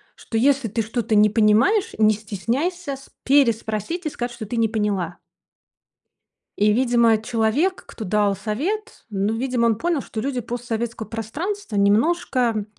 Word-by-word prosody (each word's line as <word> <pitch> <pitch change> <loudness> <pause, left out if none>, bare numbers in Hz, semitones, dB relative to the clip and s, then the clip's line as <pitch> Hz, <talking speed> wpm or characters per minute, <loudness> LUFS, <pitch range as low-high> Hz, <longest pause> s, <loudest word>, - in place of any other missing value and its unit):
что 225 - -5
если 270 0 +3
ты 225 +3 -1
что-то 225 +1 -1
не 210 0 +6
понимаешь, 225 - +3
не 215 0 +5
стесняйся 265 - -3
с 270 - -15
переспросить 250 - +1
и 310 - 0
сказать, 240 -2 -4
что 240 -2 -7
ты 235 +4 -4
не 230 -1 +3
поняла 205 -6 -2 1.4
и, 210 +1 +4
видимо, 235 -2 +3
человек, 235 - 0
кто 220 - -8
дал 205 +1 +2
совет, 370 - -4
ну 200 +1 -1
видимо 245 0 0
он 220 -2 +1
понял, 335 -2 0
что 220 - -6
люди 255 0 -2
постсоветского 235 -1 -4
пространства 285 - -4
немножко 230 0 +2
230 Hz, 145 wpm, -22 LUFS, 215-275 Hz, 1.4 s, не